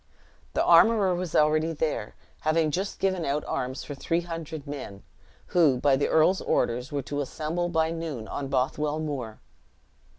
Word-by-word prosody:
The - - +3
armorer 210 -5 +5
was 175 -2 -3
already 155 +2 +3
there, 155 0 -2 0.2
having 155 0 +1
just 190 +6 -2
given 190 -3 0
out 150 0 -1
arms 130 +1 -3
for 145 - -6
three 165 +5 -1
hundred 165 -3 -6
men, 135 -9 -7 0.5
who, 155 -7 +4
by 135 +1 +3
the 140 - +1
earl's 170 +4 +3
orders 125 +5 0
were 140 -2 -2
to 145 +2 -3
assemble 160 +5 -2
by 160 -1 +1
noon 160 -9 -5
on 140 - -4
Bothwell 145 +3 0
Moor. 135 -8 -5
155 Hz, 160 wpm, -27 LUFS, 140-165 Hz, 0.5 s, armorer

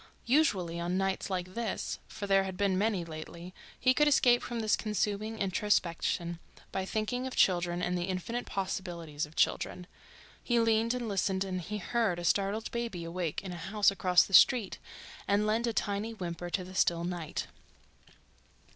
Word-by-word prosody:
Usually, 195 - +2
on 175 +2 -1
nights 195 +1 -1
like 185 -1 -3
this, 230 -2 -3
for 215 -2 -6
there 195 -1 +4
had 190 -1 -5
been 200 -2 +2
many 200 -3 0
lately, 170 +2 -8 0.3
he 255 0 +4
could 295 +3 +3
escape 245 -4 +5
from 240 -1 -4
this 215 -1 +2
consuming 215 0 -2
introspection 175 -4 0 0.3
by 190 - -2
thinking 235 +6 -2
of 260 - -6
children 175 -1 +2
and 180 - 0
the 175 0 -1
infinite 190 +6 -3
possibilities 170 -6 -3
of 155 - -19
children—he 210 +6 -2
leaned 230 +1 +2
and 245 -2 -3
listened 195 -1 0
and 185 -2 -3
he 210 +5 -4
heard 210 -2 0
a 175 - -5
startled 200 +5 0
baby 235 -7 -3
awake 165 0 -3
in 190 - -6
a - - -5
house 200 +5 +2
across 180 -2 +4
the 195 - -9
street 230 -1 +5 0.5
and 205 +1 +2
lend 225 +3 +1
a - - +1
tiny 210 +1 -2
whimper 175 -3 -5
to 185 +1 -1
the 185 +1 -10
still 170 -2 +2
night. 175 -3 -3
195 Hz, 170 wpm, -31 LUFS, 175-220 Hz, 0.5 s, escape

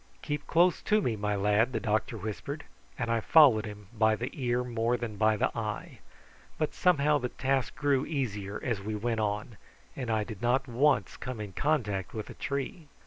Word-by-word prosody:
"Keep 145 -1 -3
close 175 +2 +3
to 215 0 +3
me, 125 - 0
my 105 0 -1
lad," 105 +5 +2
the - - 0
doctor 110 +1 -1
whispered; 110 +8 -5 0.3
and 115 -2 -1
I 115 - +2
followed 125 -4 +6
him 105 -1 -9
by 110 0 +4
the 120 +3 -4
ear 125 -2 0
more 120 0 0
than 115 -3 -5
by 110 +1 +3
the - - 0
eye; 110 -2 -4 0.6
but 155 - -1
somehow 150 -4 +3
the 125 -1 -2
task 135 -1 -1
grew 140 -2 +2
easier 105 -9 -3
as 115 -6 -1
we 105 +2 -3
went 115 +1 -1
on, 105 +1 -2 0.4
and 125 - -4
I 110 -1 +1
did 105 -2 -8
not 125 +3 +2
once 125 -3 +2
come 125 -3 -6
in 105 -2 -6
contact 110 - -1
with 110 - -5
a - - -8
tree. 140 +4 -4
115 Hz, 195 wpm, -29 LUFS, 105-135 Hz, 0.6 s, followed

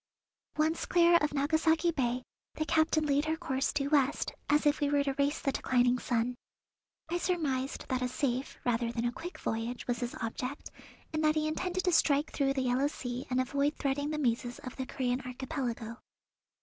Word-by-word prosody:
Once 315 +2 +1
clear 345 -1 +6
of 300 -2 0
Nagasaki 315 +3 +2
Bay 250 -4 -1 0.3
the 310 - -1
captain 315 -1 +2
laid 290 +1 +2
her 315 +1 0
course 275 -6 -1
due 280 0 -1
west, 285 -1 +2 0.2
as 295 +1 +3
if 295 0 +3
we 290 -2 +1
were 285 0 +3
to 275 -1 -1
race 280 +2 +1
the 275 - 0
declining 250 -1 +2
sun. 240 0 0 0.8
I 350 +1 0
surmised 285 -8 -1
that 255 -1 0
a 250 - +1
safe 255 0 -2
rather 235 -1 +1
than 235 0 -2
a 240 - +1
quick 345 +8 -7
voyage 230 +2 -3
was 245 -1 -1
his 245 -1 -3
object, 250 +4 -4 0.4
and 310 0 0
that 305 0 +4
he 310 0 +1
intended 365 +4 -1
to 360 - +2
strike 295 -3 +3
through 275 -1 +1
the 265 - 0
Yellow 255 +3 +2
Sea 250 -3 -5
and 255 0 +1
avoid 280 +3 +1
threading 285 +1 -1
the 305 - -2
mazes 245 -2 0
of 255 - -7
the 260 -1 -4
Corean 250 -1 -1
Archipelago. 250 -3 -4
275 Hz, 190 wpm, -31 LUFS, 250-310 Hz, 0.8 s, clear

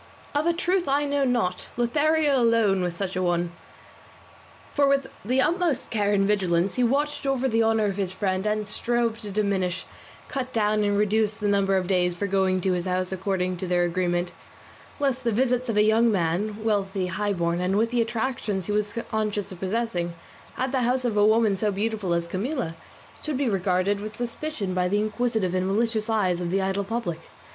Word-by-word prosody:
Of 295 +3 +1
a 340 - +3
truth 355 +2 0
I 285 +2 +2
know 285 0 +1
not; 230 -8 0
Lothario 295 +4 +2
alone 225 -5 +3
was 175 -1 -2
such 190 +1 -3
a 185 - 0
one, 175 -1 0 1.2
for 285 -1 +3
with 275 -1 +1
the 255 +6 +2
utmost 335 -4 0
care 205 -2 +1
and 195 -1 +3
vigilance 185 -3 +1
he 250 - +1
watched 285 +3 0
over 265 -1 +1
the 225 -2 +2
honour 225 -1 +2
of 200 -1 -1
his 190 -3 -1
friend, 190 +1 -1
and 210 -1 -1
strove 230 +1 0
to 210 -3 -7
diminish, 190 -3 -1 0.4
cut 260 -2 -3
down, 210 -1 +2
and 205 0 +1
reduce 210 +1 +2
the 210 -2 -2
number 195 -1 +2
of 185 - 0
days 180 -1 +1
for 200 - -1
going 190 -1 +1
to 185 0 +1
his 175 0 -2
house 185 0 -1
according 185 -1 -1
to 185 - -4
their 175 0 +2
agreement, 175 0 0 0.7
lest 270 -2 0
the 235 - +1
visits 250 +2 +1
of 220 - 0
a 210 - +6
young 225 +2 +4
man, 195 +3 0
wealthy, 195 -3 0
high 200 +3 -1
born, 170 -1 -1
and 185 +2 +1
with 225 +2 +1
the 245 -1 +2
attractions 225 -4 -2
he - - -3
was 210 0 0 0.2
conscious 210 -3 -1
of 185 - -9
possessing, 185 -4 -2 0.4
at 260 0 -1
the 265 -2 +1
house 250 +1 +1
of 230 -3 0
a 205 - +4
woman 215 -1 +4
so 210 +2 0
beautiful 205 -2 -2
as 170 0 -1
Camilla, 200 - -3 0.5
should 305 -3 -2
be 275 -1 0
regarded 195 0 +1
with 215 +1 -7
suspicion 240 -4 -3
by 180 0 +1
the 200 +3 +1
inquisitive 215 -2 0
and 185 0 0
malicious 220 +2 0
eyes 185 -5 +1
of 175 - -2
the 195 +2 +1
idle 195 +1 0
public. 200 -6 -3
210 Hz, 200 wpm, -25 LUFS, 185-235 Hz, 1.2 s, a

